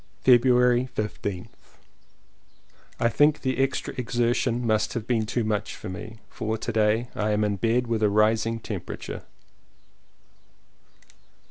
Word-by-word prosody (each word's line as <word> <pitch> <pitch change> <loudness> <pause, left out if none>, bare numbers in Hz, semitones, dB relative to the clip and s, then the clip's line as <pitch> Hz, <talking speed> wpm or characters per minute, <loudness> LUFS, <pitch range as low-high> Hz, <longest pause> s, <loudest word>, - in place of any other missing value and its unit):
February 125 0 +4
15th. 100 -3 -4 1.5
I 115 - +3
think 145 +5 +3
the 130 -1 -1
extra 135 0 -1
exertion 120 0 0
must 110 -1 +1
have 115 -3 -3
been 115 -3 0
too 120 +2 -1
much 105 -2 -2
for - - -8
me, 110 +4 -8
for 110 -1 -3
to 115 - -4
day 110 +2 +2
I 105 0 -1
am 105 0 +1
in 105 -1 0
bed 115 +4 +1
with 115 -2 -1
a 105 - +4
rising 110 +2 +2
temperature. - - -6
115 Hz, 130 wpm, -25 LUFS, 110-125 Hz, 1.5 s, February